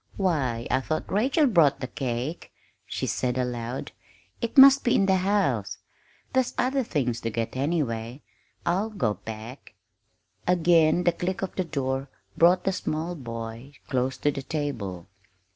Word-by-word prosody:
"Why, 135 Hz, -, 0 dB
I 130 Hz, -, +3 dB
thought 155 Hz, +4 st, -3 dB
Rachel 265 Hz, -, +3 dB
brought 165 Hz, -, +4 dB
the -, -, -3 dB
cake," 130 Hz, +4 st, -4 dB, 0.4 s
she -, -, -3 dB
said 125 Hz, 0 st, -1 dB
aloud. 125 Hz, 0 st, -3 dB, 0.5 s
"It 235 Hz, -, -3 dB
must 275 Hz, +1 st, +9 dB
be 240 Hz, -, +3 dB
in 195 Hz, -, +4 dB
the 190 Hz, -1 st, +3 dB
house; 200 Hz, +2 st, 0 dB, 0.6 s
there's 260 Hz, -2 st, +1 dB
other 260 Hz, +2 st, +1 dB
things 125 Hz, -, -1 dB
to 115 Hz, -, -2 dB
get, 115 Hz, +1 st, -3 dB
anyway. 130 Hz, -4 st, -2 dB, 0.4 s
I'll 195 Hz, +6 st, +1 dB
go 125 Hz, -, 0 dB
back." 110 Hz, +6 st, -9 dB, 0.7 s
Again 170 Hz, -1 st, +4 dB
the 175 Hz, -, +4 dB
click 180 Hz, +3 st, -3 dB
of 190 Hz, -, -3 dB
the 185 Hz, -, 0 dB
door 135 Hz, -3 st, -2 dB, 0.3 s
brought 180 Hz, +2 st, +5 dB
the 195 Hz, -, +1 dB
small 160 Hz, 0 st, -3 dB
boy 115 Hz, -2 st, -7 dB, 0.2 s
close 130 Hz, 0 st, 0 dB
to 145 Hz, -, +1 dB
the 140 Hz, -, -5 dB
table. 115 Hz, -, -4 dB
145 Hz, 150 wpm, -26 LUFS, 125-185 Hz, 0.7 s, must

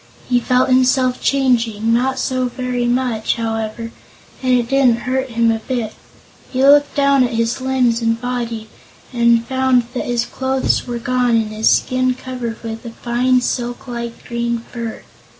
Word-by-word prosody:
He 245 Hz, -1 st, +3 dB
felt 250 Hz, +2 st, +2 dB
himself 255 Hz, 0 st, +3 dB
changing; 230 Hz, -5 st, +1 dB
not 260 Hz, +3 st, +1 dB
so 255 Hz, -1 st, -1 dB
very 250 Hz, -1 st, -2 dB
much, 240 Hz, -3 st, 0 dB
however, 225 Hz, 0 st, -3 dB, 0.5 s
and 255 Hz, -1 st, 0 dB
it 240 Hz, -1 st, -1 dB
didn't 250 Hz, -3 st, +3 dB
hurt 260 Hz, +1 st, -1 dB
him 230 Hz, -1 st, +2 dB
a 225 Hz, -, -1 dB
bit. 225 Hz, -2 st, -3 dB, 0.6 s
He 260 Hz, 0 st, 0 dB
looked 285 Hz, +1 st, +5 dB
down 280 Hz, -2 st, +4 dB
at 245 Hz, -1 st, -1 dB
his 230 Hz, +2 st, -1 dB
limbs 255 Hz, -3 st, +1 dB
and 230 Hz, 0 st, 0 dB
body 235 Hz, -3 st, -4 dB, 0.5 s
and 235 Hz, -1 st, +3 dB
found 260 Hz, -1 st, +2 dB
that 255 Hz, -, -3 dB
his 240 Hz, -1 st, 0 dB
clothes 265 Hz, 0 st, -1 dB
were 240 Hz, -1 st, -3 dB
gone 245 Hz, 0 st, +1 dB
and 220 Hz, -1 st, 0 dB
his 215 Hz, +1 st, +2 dB
skin 255 Hz, 0 st, +2 dB
covered 250 Hz, -3 st, -6 dB
with 225 Hz, 0 st, -6 dB
a 235 Hz, -, -6 dB
fine, 250 Hz, +2 st, +1 dB
silk 245 Hz, +1 st, -3 dB
like 235 Hz, -1 st, -6 dB
green 235 Hz, 0 st, -1 dB
fur. 235 Hz, -2 st, -6 dB
245 Hz, 165 wpm, -18 LUFS, 230-255 Hz, 0.6 s, looked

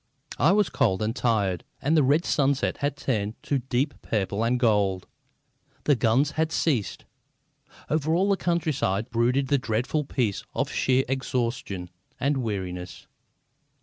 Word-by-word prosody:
I 160 Hz, -, +5 dB
was 205 Hz, -1 st, +3 dB
cold 95 Hz, -1 st, +1 dB
and 110 Hz, +2 st, -1 dB
tired, 100 Hz, -9 st, 0 dB, 0.2 s
and 155 Hz, +4 st, +1 dB
the 155 Hz, -, +5 dB
red 145 Hz, +5 st, +3 dB
sunset 140 Hz, -1 st, +1 dB
had 145 Hz, 0 st, -2 dB
turned 110 Hz, -5 st, -1 dB
to 140 Hz, -, 0 dB
deep 130 Hz, +3 st, -1 dB
purple 105 Hz, 0 st, -1 dB
and 120 Hz, +2 st, +1 dB
gold. 100 Hz, -6 st, +2 dB, 0.8 s
The 145 Hz, -, +4 dB
guns 125 Hz, +5 st, +2 dB
had 160 Hz, +1 st, -1 dB
ceased. 130 Hz, -13 st, -1 dB, 0.8 s
Over 155 Hz, +2 st, +1 dB
all 190 Hz, +3 st, +2 dB
the 200 Hz, -, +3 dB
countryside 145 Hz, -, -1 dB
brooded 125 Hz, +3 st, +1 dB
the 140 Hz, -, +3 dB
dreadful 125 Hz, +7 st, -1 dB
peace 120 Hz, -7 st, -1 dB
of -, -, -1 dB
sheer 130 Hz, 0 st, +2 dB
exhaustion 120 Hz, -8 st, -2 dB, 0.3 s
and 140 Hz, +1 st, +1 dB
weariness. 95 Hz, -7 st, -4 dB
125 Hz, 145 wpm, -26 LUFS, 110-145 Hz, 0.8 s, I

